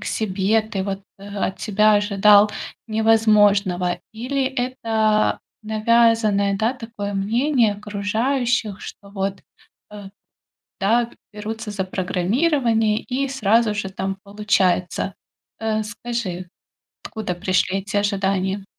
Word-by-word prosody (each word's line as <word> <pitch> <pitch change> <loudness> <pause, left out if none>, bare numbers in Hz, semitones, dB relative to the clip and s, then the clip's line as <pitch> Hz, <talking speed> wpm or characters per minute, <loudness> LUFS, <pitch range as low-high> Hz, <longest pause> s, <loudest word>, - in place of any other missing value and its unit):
к - - -8
себе, 210 +1 +1
ты 215 -3 -4
вот, 195 0 -4 0.2
э, 195 - -12
от 200 -1 -3
себя 215 0 +3
ожидал 205 0 +5 0.4
невозможного 205 -5 +3
или 255 +5 -2
это 225 -5 0 0.2
навязанное, 215 -2 +2
да, 220 +4 +1
такое 225 -5 -6
мнение 230 +3 +2
окружающих, 215 +2 -1
что 200 - -10
вот, 195 -1 -3 0.5
э, 205 -2 -9 0.7
да, 225 +5 +3
б - - -19 0.2
берутся 215 +1 -6
за 200 -2 -2
программирование 220 - +1
и 270 +2 -2
сразу 230 -3 +2
же 205 -2 -3
там 190 0 -4
получается. 200 -3 0 0.4
Э, 220 -1 -1
скажи, 210 -4 -5 0.6
откуда 215 -5 -4
пришли 185 +1 0
эти 200 +1 -5
ожидания? 195 -1 0
210 Hz, 110 wpm, -21 LUFS, 195-225 Hz, 0.7 s, ожидал